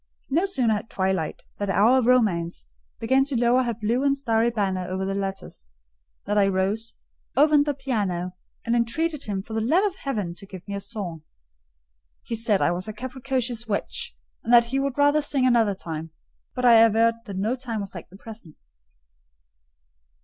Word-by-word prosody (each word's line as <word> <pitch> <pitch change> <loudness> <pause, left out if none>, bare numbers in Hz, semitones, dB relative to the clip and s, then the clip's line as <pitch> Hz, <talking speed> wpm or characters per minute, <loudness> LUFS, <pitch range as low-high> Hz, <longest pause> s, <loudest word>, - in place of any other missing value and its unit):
No 340 +8 +2
sooner 250 - +1
had 210 +1 -4
twilight, 190 -4 -2 0.2
that 205 -1 -2
hour 225 +7 +4
of 240 - 0
romance, 180 - +2 0.3
began 265 +4 +3
to 275 -4 -1
lower 240 +2 +4
her 240 -2 -1
blue 230 +4 0
and 280 0 +2
starry 230 -4 +1
banner 190 -5 -1
over 190 +1 -3
the 195 - -2
lattice, 195 - -5 0.6
than 205 +1 +1
I 200 - +4
rose, 195 +4 -1 0.4
opened 295 0 +5
the 290 - 0
piano, 205 -10 -2 0.3
and 235 0 +1
entreated 295 +6 -1
him, 195 -2 -3
for 220 - -9
the 220 - 0
love 325 - +3
of 390 -2 -2
heaven, 210 -11 -3
to 195 - -11
give 185 -1 -11
me 200 - -5
a 200 - -2
song. 195 -6 -6 1.0
He - - -6
said 220 -3 +1
I - - +3
was 180 +3 -3
a 215 - -5
capricious 255 -1 -3
witch, - - -3 0.3
and 230 - -2
that 235 -1 +7
he 270 - +2
would 275 -1 -2
rather 290 +1 +4
sing 280 -3 0
another 230 -5 +3
time; 165 -3 -6 0.5
but 250 - -1
I 235 -2 +8
averred 225 +1 +5
that 200 -4 -6
no 215 +6 0
time 240 -4 -5
was 200 -2 -6
like 175 - -9
the 190 - -14
present. 215 -7 -12
225 Hz, 185 wpm, -24 LUFS, 195-255 Hz, 1.0 s, I